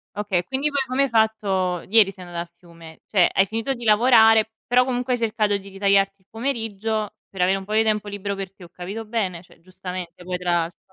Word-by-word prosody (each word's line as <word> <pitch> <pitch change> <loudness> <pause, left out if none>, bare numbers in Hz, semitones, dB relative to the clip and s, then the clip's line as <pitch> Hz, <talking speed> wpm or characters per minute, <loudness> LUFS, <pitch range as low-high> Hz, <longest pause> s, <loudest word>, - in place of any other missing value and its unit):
Okay 205 -3 0
e - - -9
quindi 270 +3 -1
poi 285 -2 0
come 255 +2 +1
hai - - -1
fatto 200 -6 +1
ieri 210 -1 +5
sei 185 - -11
andata 170 -1 -5
al 170 - -13
fiume? 165 -2 -15
Cioè, 185 -4 +3
hai 195 - +3
finito 225 +6 -2
di 240 -2 -8
lavorare, 220 0 +5 0.2
però 250 +1 +4
comunque 250 0 -1
hai - - -1
cercato 215 -3 +1
di 200 0 -10
ritagliarti 195 0 +1
il 190 - -34
pomeriggio 225 -3 -3 0.2
per 190 - -9
avere 185 +2 +3
un 195 - -6
po' 210 - -7
di 220 +1 +4
tempo 210 -1 0
libero 200 0 -4
per 195 -1 -6
te, 185 - -14
ho - - -13
capito 195 +6 -7
bene? 190 -6 -2
Cioè, 175 - -21
giustamente 180 -1 -8
poi, 180 0 -3
tra 180 0 -3
l'altro. 170 0 -1
200 Hz, 230 wpm, -23 LUFS, 185-225 Hz, 0.2 s, ieri